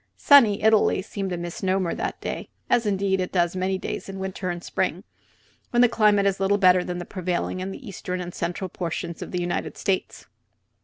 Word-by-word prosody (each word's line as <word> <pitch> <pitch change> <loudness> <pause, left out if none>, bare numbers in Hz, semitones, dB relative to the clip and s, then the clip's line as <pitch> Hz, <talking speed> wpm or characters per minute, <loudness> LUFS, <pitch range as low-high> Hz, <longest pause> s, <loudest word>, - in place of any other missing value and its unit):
"Sunny 230 -9 +6
Italy" 215 -3 +4
seemed 195 -1 -4
a 180 - -2
misnomer 180 +1 -1
that - - -4
day, - - -5 0.2
as 235 -3 +3
indeed 195 -1 +1
it 180 - -3
does 175 -1 +1
many 190 +1 0
days 185 - -5
in 195 - -6
winter 190 -1 -4
and 175 0 -4
spring, - - -2 0.7
when 240 0 +4
the - - +7
climate 210 -3 +3
is 195 -1 +1
little 195 +1 +2
better 185 -2 +5
than 180 0 -4
that 175 - -5
prevailing 185 0 -2
in 185 +1 -3
the 245 +6 -9
eastern 185 -2 -4
and 175 -1 -6
central 175 +3 -3
portions 170 -1 -5
of - - -6
the 180 - -2
United 175 0 -3
States. 190 -1 -2
190 Hz, 200 wpm, -24 LUFS, 180-200 Hz, 0.7 s, the